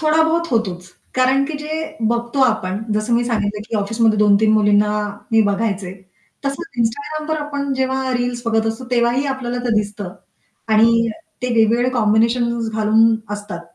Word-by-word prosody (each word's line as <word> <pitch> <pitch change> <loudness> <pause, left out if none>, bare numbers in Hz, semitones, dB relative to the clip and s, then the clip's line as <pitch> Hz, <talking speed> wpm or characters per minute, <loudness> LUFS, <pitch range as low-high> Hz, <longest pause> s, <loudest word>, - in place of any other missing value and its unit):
थोडाबहुत 320 +2 +2
होतोच. 185 -6 -1 0.3
कारण 260 +2 +3
की 305 +2 -5
जे 310 +1 -5
बघतो 235 +3 -1
आपण 200 -5 0
जसं 215 +3 -1
मी 240 +1 +2
सांगितलं 210 -3 -2
की 225 - -2
ऑफिसमध्ये 215 +1 +1
2-3 210 +1 +4
मुलींना 210 0 +3 0.4
मी 225 - +5
बघायचे. 200 -2 -1 0.5
तसंच 275 -3 -5
instagramवर 300 +7 -2
आपण 280 -1 -3
जेव्हा 265 0 -1
रील्स 245 -1 -2
बघत 225 -1 +1
असतो, 225 +3 -3
तेव्हाही 240 +3 +2
आपल्याला 255 -3 -3
ते 245 - 0
दिसतं, 205 -3 -5 0.5
आणि 230 +1 +4 0.3
ते 250 - -1
वेगवेगळे 230 +2 +3
कॉम्बिनेशन्स 230 +1 +1
घालून 220 +1 +3 0.2
असतात. 205 -4 -7
230 Hz, 145 wpm, -19 LUFS, 215-260 Hz, 0.5 s, मी